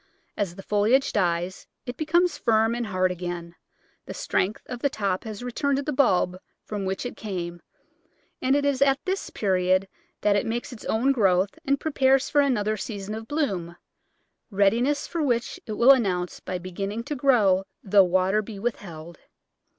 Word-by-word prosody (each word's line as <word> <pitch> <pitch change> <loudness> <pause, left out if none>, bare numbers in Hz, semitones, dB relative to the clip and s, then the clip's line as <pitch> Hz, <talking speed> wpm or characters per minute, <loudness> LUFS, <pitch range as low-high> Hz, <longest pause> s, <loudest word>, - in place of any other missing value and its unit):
As 195 -5 -2
the 195 - -10
foliage 220 +8 +2
dies 175 -1 -1 0.2
it 245 -1 -5
becomes 340 +5 +2
firm 225 0 +2
and 240 -1 -2
hard 185 -2 +1
again, 175 -1 -5 0.5
the - - -6
strength 200 +4 -1
of 250 - -6
the 280 - +1
top 200 -5 -2
has 215 +1 -6
returned 275 +3 0
to 280 - -2
the 300 - -2
bulb 185 -9 +2 0.3
from 205 -2 -4
which 190 +5 -3
it 245 - -5
came, 175 -5 -5 0.8
and 265 +2 +3
it 285 0 +1
is 280 -2 +1
at 275 -1 +5
this 380 +1 -2
period 185 -1 +1 0.3
that 210 -1 +3
it 205 - 0
makes 240 +3 -3
its 225 - -11
own 245 +5 +2
growth 195 - +2
and 275 0 +1
prepares 270 -3 +2
for 290 - +5
another 215 -6 +1
season 205 -1 -5
of 220 +1 -6
bloom, 195 - -2 0.7
readiness 230 +8 +2
for 335 - -3
which 240 -5 -1
it 215 - -3
will 235 +5 +6
announce 185 -9 +1
by 185 - -4
beginning 195 +5 -4
to 295 - -4
grow 220 -9 +3 0.2
though 200 0 +5
water 185 +3 +2
be 215 -1 -9
withheld. 175 -7 -5
215 Hz, 175 wpm, -25 LUFS, 185-260 Hz, 0.8 s, will